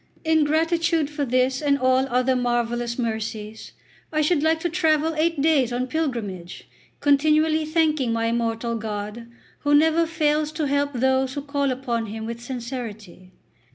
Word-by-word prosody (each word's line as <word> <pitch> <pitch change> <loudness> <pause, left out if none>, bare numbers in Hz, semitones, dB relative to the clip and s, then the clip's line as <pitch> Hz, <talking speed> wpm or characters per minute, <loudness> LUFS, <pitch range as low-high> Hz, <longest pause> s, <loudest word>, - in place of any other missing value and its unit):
In 320 -1 +3
gratitude 325 0 +1
for 290 -1 -2
this 255 +2 +1
and 285 -1 +2
all 260 0 +2
other 255 +1 +2
marvellous 240 -1 -1
mercies, 220 -2 -4 0.4
I 310 -1 +1
should 305 0 +2
like 320 +1 +2
to 345 - 0
travel 320 -2 +1
eight 320 0 0
days 285 -6 +3
on 245 +1 -1
pilgrimage, 235 - -4 0.3
continually 310 +2 +3
thanking 310 -5 +1
my 230 0 0
immortal 230 0 -1
God, 210 +1 -5 0.3
who 290 0 +2
never 320 +2 +4
fails 305 -2 0
to 310 -1 -2
help 285 0 0
those 265 +1 +1
who 285 - -4
call 280 -1 -1
upon 245 -3 -2
Him 220 +1 -6
with 235 +1 -6
sincerity." 230 -7 -7
265 Hz, 155 wpm, -23 LUFS, 235-310 Hz, 0.4 s, never